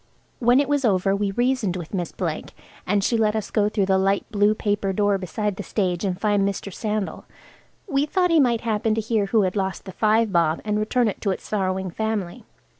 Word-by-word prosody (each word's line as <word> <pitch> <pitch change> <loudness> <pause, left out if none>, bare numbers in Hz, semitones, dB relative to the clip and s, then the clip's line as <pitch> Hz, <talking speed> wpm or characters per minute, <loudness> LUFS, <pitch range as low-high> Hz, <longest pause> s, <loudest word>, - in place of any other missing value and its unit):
When 245 +2 +4
it 285 - +1
was 290 -1 +1
over 195 -3 +2
we 200 0 -1
reasoned 240 -3 0
with 175 -1 -7
Miss 175 -4 -2
Blake, 165 -5 -4 0.3
and 200 +1 +2
she 230 - +2
let 215 -1 +2
us 215 -2 -3
go 210 -1 +2
through 205 -2 0
the 190 0 +2
light 195 +1 +1
blue 210 0 +3
paper 205 -2 -1
door 205 0 +1
beside 200 +2 -3
the - - -4
stage 185 -3 -1
and 185 -3 -2
find 205 -2 +2
Mr. 200 0 -2
Sandal. 215 -1 -3 0.6
We 285 -3 +1
thought 360 +2 +1
he 330 - +5
might 240 -5 +3
happen 220 -1 0
to 225 - 0
hear 215 -2 0
who 215 +1 +3
had 185 +1 -1
lost 190 -2 -2
the 190 - -7
five 215 +2 +2
bob, 165 -3 +2
and 210 0 0
return 235 +3 +1
it 205 - -4
to 205 - 0
its 190 - -3
sorrowing 190 -2 -1
family. 220 +1 -3
205 Hz, 220 wpm, -23 LUFS, 190-220 Hz, 0.6 s, he